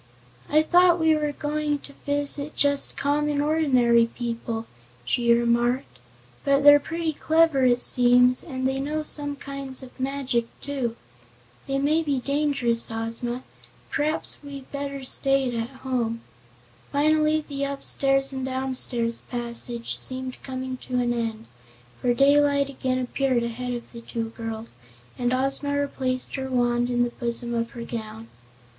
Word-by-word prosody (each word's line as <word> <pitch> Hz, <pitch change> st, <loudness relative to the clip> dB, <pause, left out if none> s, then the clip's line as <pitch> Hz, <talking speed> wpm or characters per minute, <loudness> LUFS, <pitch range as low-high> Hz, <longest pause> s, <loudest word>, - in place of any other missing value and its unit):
"I'd 310 Hz, +1 st, +2 dB
thought 355 Hz, -1 st, +6 dB
we 320 Hz, -1 st, +4 dB
were 300 Hz, -1 st, 0 dB
going 295 Hz, 0 st, -1 dB
to 280 Hz, -, -12 dB
visit 285 Hz, +1 st, +1 dB
just 285 Hz, -1 st, +1 dB
common, 290 Hz, +1 st, 0 dB
ordinary 260 Hz, -7 st, +3 dB
people," 230 Hz, -1 st, -4 dB, 0.4 s
she 235 Hz, -, +2 dB
remarked, 235 Hz, -, +1 dB, 0.4 s
"but 280 Hz, 0 st, +3 dB
they're 290 Hz, 0 st, +9 dB
pretty 325 Hz, +2 st, -3 dB
clever, 315 Hz, -3 st, +3 dB
it 245 Hz, -1 st, +4 dB
seems, 250 Hz, 0 st, +4 dB
and 260 Hz, -4 st, -2 dB
they 265 Hz, 0 st, -1 dB
know 300 Hz, +3 st, -2 dB
some 290 Hz, -1 st, -3 dB
kinds 275 Hz, -1 st, -6 dB
of 260 Hz, +1 st, -14 dB
magic, 260 Hz, -3 st, -1 dB
too. 265 Hz, -5 st, -3 dB, 0.7 s
They 275 Hz, 0 st, 0 dB
may 300 Hz, +4 st, +2 dB
be 290 Hz, -4 st, 0 dB
dangerous, 275 Hz, -4 st, 0 dB
Ozma. 230 Hz, +2 st, -3 dB, 0.5 s
P'raps 300 Hz, +2 st, 0 dB
we'd 280 Hz, -2 st, -9 dB
better 280 Hz, -1 st, -4 dB
stayed 270 Hz, -1 st, +2 dB
at 230 Hz, 0 st, -2 dB, 0.2 s
home." 230 Hz, -3 st, -1 dB, 0.7 s
Finally 305 Hz, +1 st, +2 dB
the 280 Hz, -1 st, -2 dB
upstairs 275 Hz, -1 st, +1 dB
and 265 Hz, -1 st, -4 dB
downstairs 255 Hz, -3 st, 0 dB
passage 235 Hz, -1 st, -2 dB
seemed 255 Hz, 0 st, -2 dB
coming 260 Hz, -1 st, -5 dB
to 255 Hz, -, -6 dB
an 240 Hz, -1 st, +1 dB
end, 225 Hz, -1 st, -3 dB, 0.6 s
for 245 Hz, -1 st, +2 dB
daylight 280 Hz, +1 st, +4 dB
again 255 Hz, -1 st, -1 dB
appeared 255 Hz, -1 st, 0 dB
ahead 245 Hz, +2 st, -3 dB
of 240 Hz, -, -8 dB
the 235 Hz, -, -9 dB
two 230 Hz, -1 st, -4 dB
girls 225 Hz, -, -7 dB, 0.4 s
and 245 Hz, 0 st, +1 dB
Ozma 275 Hz, +2 st, +2 dB
replaced 260 Hz, -3 st, -2 dB
her 265 Hz, 0 st, -4 dB
wand 240 Hz, -1 st, +1 dB
in 245 Hz, 0 st, +2 dB
the 240 Hz, -, -1 dB
bosom 240 Hz, -1 st, -4 dB
of 230 Hz, 0 st, -1 dB
her 235 Hz, -, -5 dB
gown. 225 Hz, -1 st, -7 dB
260 Hz, 145 wpm, -25 LUFS, 240-285 Hz, 0.7 s, they're